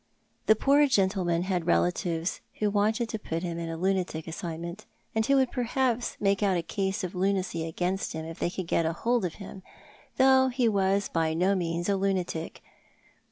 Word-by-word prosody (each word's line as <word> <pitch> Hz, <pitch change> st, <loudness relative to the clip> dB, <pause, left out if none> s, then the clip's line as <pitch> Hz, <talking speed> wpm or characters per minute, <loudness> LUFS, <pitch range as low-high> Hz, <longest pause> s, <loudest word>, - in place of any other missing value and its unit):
The 220 Hz, -, +7 dB
poor 285 Hz, +6 st, +4 dB
gentleman 190 Hz, -7 st, +1 dB
had 180 Hz, -3 st, -2 dB
relatives 160 Hz, -, 0 dB, 0.2 s
who 210 Hz, -1 st, +1 dB
wanted 215 Hz, +3 st, +1 dB
to 220 Hz, -, -3 dB
put 165 Hz, -3 st, -4 dB
him 170 Hz, -1 st, -3 dB
in 165 Hz, -1 st, -4 dB
a 165 Hz, -, -4 dB
lunatic 180 Hz, -3 st, -1 dB
asylum, 170 Hz, +1 st, -5 dB, 0.4 s
and 220 Hz, -, +1 dB
who 275 Hz, -, +4 dB
would 265 Hz, -2 st, +3 dB
perhaps 245 Hz, -1 st, 0 dB
make 200 Hz, 0 st, +1 dB
out 195 Hz, -3 st, +2 dB
a 170 Hz, -, -2 dB
case 190 Hz, +3 st, -2 dB
of 185 Hz, -, -4 dB
lunacy 185 Hz, -3 st, -1 dB
against 180 Hz, +4 st, -2 dB
him 160 Hz, 0 st, -5 dB
if 165 Hz, 0 st, -8 dB
they -, -, 0 dB
could 185 Hz, 0 st, -5 dB
get 165 Hz, -, +1 dB
hold 230 Hz, +6 st, 0 dB
of 170 Hz, -, -4 dB
him, 195 Hz, -1 st, -9 dB, 0.6 s
though 265 Hz, 0 st, +6 dB
he 250 Hz, -2 st, +1 dB
was 200 Hz, -1 st, +2 dB
by 160 Hz, -1 st, 0 dB
no 185 Hz, +4 st, +2 dB
means 170 Hz, -2 st, -1 dB
a 200 Hz, -, +2 dB
lunatic. 185 Hz, -4 st, -2 dB
190 Hz, 185 wpm, -28 LUFS, 170-215 Hz, 0.6 s, The